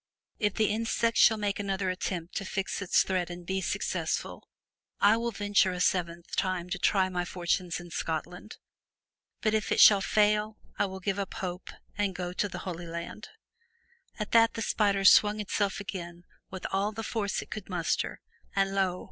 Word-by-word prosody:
If 210 -3 0
the 220 - +2
insect 230 +1 0
shall 220 - +6
make 205 -1 -2
another 195 -2 -1
effort 180 -2 -4
to 195 - -3
fix 195 +1 -3
its 190 - +3
thread 185 -2 -1
and 175 0 -8
be 190 +1 -1
successful, - - -2 0.5
I 205 +2 +6
will 235 +1 -1
venture 205 -3 +2
a 180 - -5
seventh 170 -2 -1
time 180 -1 -1
to 195 - -2
try 190 0 +3
my 180 -1 -2
fortunes 175 0 -1
in 175 -1 -11
Scotland, 170 +6 -4 0.8
but 215 -1 +1
if 215 -1 0
it - - +2
shall 200 -2 +8
fail 210 +1 +2 0.2
I - - +2
will 190 0 -8
give 195 +1 -1
up 195 - -4
hope 180 -1 -5 0.3
and 200 -2 0
go 180 -1 -4
to 205 +2 -1
the - - -7
Holy 175 -2 -5
Land/' 170 +5 -6 0.9
At 210 -1 -4
that 230 -1 +5
the 225 - -2
spider 200 -3 +1
swung 210 +2 +6
itself 205 -1 -1
again 175 -3 -7 0.3
with 190 -1 -8
all 195 +2 0
the 225 +1 -6
force 210 -3 -2
it - - -20
could 210 -3 -6
muster, 175 -3 -1 0.3
and 195 0 +1
lo! 190 -2 +1
195 Hz, 180 wpm, -29 LUFS, 180-210 Hz, 0.9 s, shall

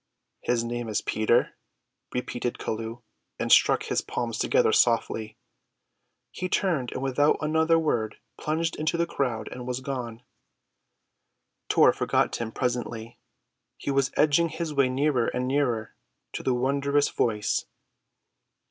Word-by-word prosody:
"His 120 -1 0
name 120 0 -4
is 105 - -1
Peter," 110 +2 +2 0.6
repeated 125 -1 -3
Chelluh, 115 +2 -5 0.3
and - - -2
struck - - +5
his - - 0
palms 115 -2 -3
together - - +3
softly. 110 -2 +1 0.9
He 185 - -4
turned 165 -11 0
and 130 - -4
without 140 +3 +3
another 160 +2 +3
word 120 -9 0 0.2
plunged 160 +2 -1
into 155 +2 0
the 170 - +2
crowd 125 -9 -2
and 125 0 -7
was 125 0 -2
gone. 125 -4 -5 1.5
Tor - - +6
forgot - - +1
him 115 -1 -4
presently. 120 -2 -3 0.6
He - - -3
was 135 -1 +2
edging 155 +3 +4
his 160 -1 -4
way 140 -2 +3
nearer 130 -2 +1
and 125 0 -2
nearer 125 -5 0 0.4
to - - -4
the 130 - +1
wondrous 140 +3 +1
Voice. 105 -3 0
125 Hz, 130 wpm, -26 LUFS, 115-145 Hz, 1.5 s, Tor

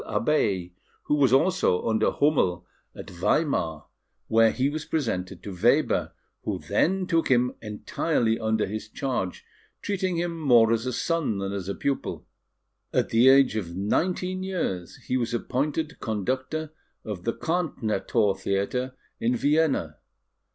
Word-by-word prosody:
Abeille, 105 - 0 0.4
and 150 - +3
was 135 -4 +4
also 155 - +2
under 110 -1 +2
Hummel 95 - +1 0.3
at - - -9
Weimar, 85 - 0 0.4
where 115 0 +5
he 130 +1 0
was 150 +2 -3
presented 100 - -3
to 100 - -6
Weber, 90 - +2 0.3
who - - -2
then 190 +2 +1
took 165 -2 +1
him 125 -1 +3
entirely 115 +2 -1
under 110 -1 +1
his 110 +2 -6
charge, 125 -8 -3 0.4
treating 190 -3 -1
him 170 -1 -2
more 120 -6 +5
as 115 +2 -1
a - - 0
son 160 -4 -1
than 100 0 -3
as 100 -1 -4
a 100 - -2
pupil. 140 -1 -3 0.7
At - - +1
the 120 +3 +5
age 135 -4 +5
of 90 -6 -4
nineteen 180 - 0
years, 130 - -3
he 130 - 0
was 120 -1 -1
appointed 150 +6 -2
conductor 130 +8 -2 0.3
of 100 -5 -5
the 115 - 0
Karnthnerthor 110 - 0
Theatre 100 +7 -1 0.2
in 120 +2 +1
Vienna. 140 - +1
120 Hz, 140 wpm, -26 LUFS, 100-155 Hz, 0.7 s, where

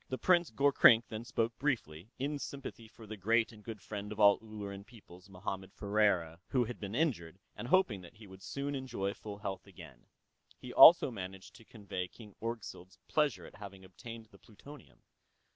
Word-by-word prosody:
The 130 - -2
Prince 175 +1 +3
Gorkrink 135 -4 +5
then 110 0 -5
spoke 115 0 -2
briefly, 110 - -2
in 145 +2 -2
sympathy 135 -5 -7
for 115 0 -14
the 110 0 -8
great 115 +4 +2
and 105 -2 -15
good 110 -3 -8
friend 105 -1 -6
of 105 - -7
all 100 -1 +6
Ulleran 100 -3 -8
peoples, 100 -5 -16
Mohammed 95 0 -6
Ferriera, 100 -6 +1
who 125 -2 +1
had 120 +2 -7
been 100 0 -5
injured, 100 - -1 0.2
and 120 - -6
hoping 125 - +2
that 90 +5 -14
he 110 0 -14
would 95 -1 -14
soon 140 +6 -4
enjoy 120 -8 -3
full 105 -1 -9
health 100 -2 -6
again. 80 -10 -14 0.5
He 125 - -9
also 165 -5 +9
managed 95 -3 -8
to 115 - -17
convey 100 -5 -6
King 105 +1 -14
Orgzild's 110 -5 -6
pleasure 150 -5 +1
at - - -13
having 95 -2 -10
obtained 115 +5 -10
the 100 - -18
plutonium. 140 +7 -15
105 Hz, 180 wpm, -33 LUFS, 95-120 Hz, 0.5 s, also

